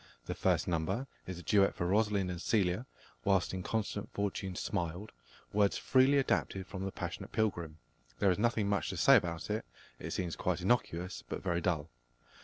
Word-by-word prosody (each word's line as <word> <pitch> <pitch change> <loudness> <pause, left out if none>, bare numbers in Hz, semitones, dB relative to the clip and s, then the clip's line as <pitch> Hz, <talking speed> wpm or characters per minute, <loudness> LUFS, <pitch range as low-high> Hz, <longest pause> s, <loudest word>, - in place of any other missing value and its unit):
The - - -3
first - - +1
number 90 +9 0 0.2
is 95 -1 -5
a 90 - -9
duet 100 -2 +4
for 85 - -2
Rosalind 100 -1 +2
and 90 0 -5
Celia, 100 +3 +1 0.4
"Whilst 95 +3 +2
inconstant 105 +2 -2
fortune 100 -2 -2
smiled," 90 +2 -3 0.4
words 100 -1 +3
freely 135 +2 +4
adapted 95 -7 0
from 95 0 -6
The 95 - -3
Passionate - - -5
Pilgrim. 85 -8 -1 0.4
There 100 -2 +4
is 90 - -1
nothing 110 -2 +2
much 100 -1 0
to 95 - -4
say 135 +9 +7
about 85 -3 0
it: 110 - -1 0.4
it - - -5
seems 90 -3 -2
quite 90 -1 -1
innocuous, 90 -3 0
but - - -4
very 85 -2 0
dull. 80 -6 -1
95 Hz, 175 wpm, -33 LUFS, 90-105 Hz, 0.4 s, say